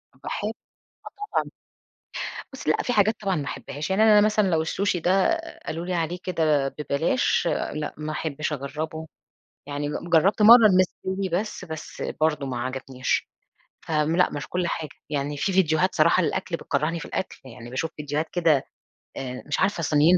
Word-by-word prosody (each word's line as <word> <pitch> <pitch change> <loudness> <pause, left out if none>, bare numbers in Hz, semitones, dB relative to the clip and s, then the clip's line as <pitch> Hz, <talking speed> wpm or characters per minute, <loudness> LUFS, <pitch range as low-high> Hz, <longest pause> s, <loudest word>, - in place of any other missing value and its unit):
باحب 205 - -4
آه 220 - -9 0.6
طبعًا. - - +1 1.0
بُصّي - - -3
لأ - - +2
في 245 - -1
حاجات 215 -1 +4
طبعًا 195 -3 0
ما 145 - -2
أحبهاش، 140 +5 -5
يعني 195 +3 +3
أنا 215 -1 +7
مثلًا 210 -1 +3
لو 165 -3 +2
السوشي 185 +3 0
ده 195 - +3 0.3
قالوا 165 +2 -4
لي 180 - -1
عليه 170 +1 -1
كده 155 -6 +1
ببلاش 150 - 0 0.3
لأ، 150 0 -4
ما 155 0 -4
أحبش 155 0 -3
أجربه. 155 +3 -4 0.6
يعني 145 0 -3
ج 170 +3 -5
جرّبت 190 +6 +4
مرّة 230 +1 +10
المستوي 190 0 +1
بس، 210 -3 -6
بس 160 -3 -7 0.2
برضو 150 -3 +1
ما 125 -2 -3
عجبنيش، 130 0 -2 0.5
فم 155 0 0
لأ 180 - +4
مش 145 - -5
كل 180 -1 -1
حاجة، 160 -2 -3 0.2
يعني 145 0 -2
في 195 - 0
ڤيديوهات 180 -1 +3
صراحة 170 +3 +4
للأكل 185 0 -1
بتكرّهني 155 +3 -1
في - - -7
الأكل. 190 - -4
يعني 120 -1 -10
باشوف 135 +6 -2
ڤيديوهات 150 +2 -2
كده 165 -6 +3 0.5
آآ 125 -1 -5
مش 145 - -1
عارفة 190 -3 +1
صينيين، 155 +4 +5
160 Hz, 165 wpm, -25 LUFS, 145-185 Hz, 1.0 s, مرّة